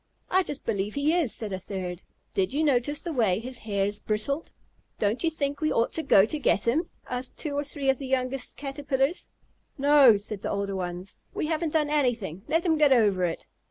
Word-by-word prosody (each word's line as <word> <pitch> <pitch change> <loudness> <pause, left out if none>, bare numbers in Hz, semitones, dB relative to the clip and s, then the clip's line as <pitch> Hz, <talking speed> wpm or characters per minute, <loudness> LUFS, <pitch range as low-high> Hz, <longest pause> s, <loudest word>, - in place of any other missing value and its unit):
"I 375 - +5
just 290 -6 -5
believe 205 +1 -2
he 285 +3 +2
is," 335 -9 +1
said 215 -4 -3
a 190 - -3
third. 185 -2 -5 0.3
"Did 195 +6 0
you 310 - +2
notice 290 +1 +1
the 340 - -4
way 215 -9 +2
his 250 +3 -5
hairs 205 -1 -1
bristled?" 250 +9 -2 0.5
"Don't 215 +7 0
you 330 - +3
think 285 -2 -2
we 310 - +1
ought 230 - +1
to 320 - -1
go 195 -10 +5
to 300 +7 -3
get 235 -5 +1
him?" 310 +9 +1 0.2
asked 250 +1 -4
two 295 -3 -4
or 290 - 0
three 285 -1 -5
of 265 -1 +3
the 275 - -5
youngest 255 0 -1
Caterpillars. 275 +2 -1 0.5
"No," 280 -5 +6
said 205 0 -6
the - - -3
older 200 -1 -2
ones. 180 0 -5 0.2
"We - - -1
haven't 315 0 -1
done 300 -2 +1
anything. 235 - 0
Let 330 +2 +1
him 320 -3 +2
get 295 -2 +5
over 205 -7 +4
it." 165 - -4
260 Hz, 210 wpm, -27 LUFS, 205-295 Hz, 0.5 s, No